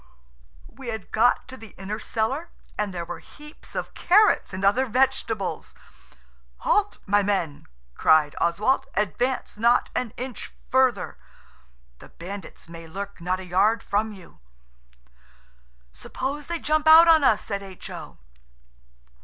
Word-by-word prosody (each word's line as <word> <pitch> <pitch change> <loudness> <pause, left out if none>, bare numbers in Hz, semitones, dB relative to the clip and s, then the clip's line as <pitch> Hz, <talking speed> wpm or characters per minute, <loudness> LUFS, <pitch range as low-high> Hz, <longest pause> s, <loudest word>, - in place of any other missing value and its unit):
We 265 -2 -12
had 220 -4 -6
got 240 +3 +3
to 260 - -9
the 225 -5 -13
inner 200 +3 -5
cellar, 265 +12 -2 0.3
and 210 -1 -2
there 170 -2 -5
were 175 0 -7
heaps 300 +1 -15
of - - -4
carrots 420 +4 +4
and 190 +1 -3
other 255 +7 +3
vegetables. 235 -5 -1 0.9
"Halt, 410 0 +1
my 205 +1 +3
men!" 190 -7 -2 0.3
cried 150 - +4
Oswald, 215 +11 +1
"advance 210 +3 -1
not 235 +2 +3
an 250 -4 -1
inch 250 -2 -7 0.2
further! 250 - +2 0.8
The - - -14
bandits 190 +1 -9
may 165 0 -10
lurk 195 +2 -7
not 180 +2 -1
a 190 - -8
yard 210 +6 +2
from 215 +2 0
you!" 190 -5 -14 1.5
"Suppose 280 +3 -5
they 340 - -2
jump 310 0 0
out 325 +2 +9
on 320 -2 +6
us?" 220 -5 +3
said 200 -1 -4
H.O. 190 -2 -9
215 Hz, 135 wpm, -25 LUFS, 190-265 Hz, 1.5 s, out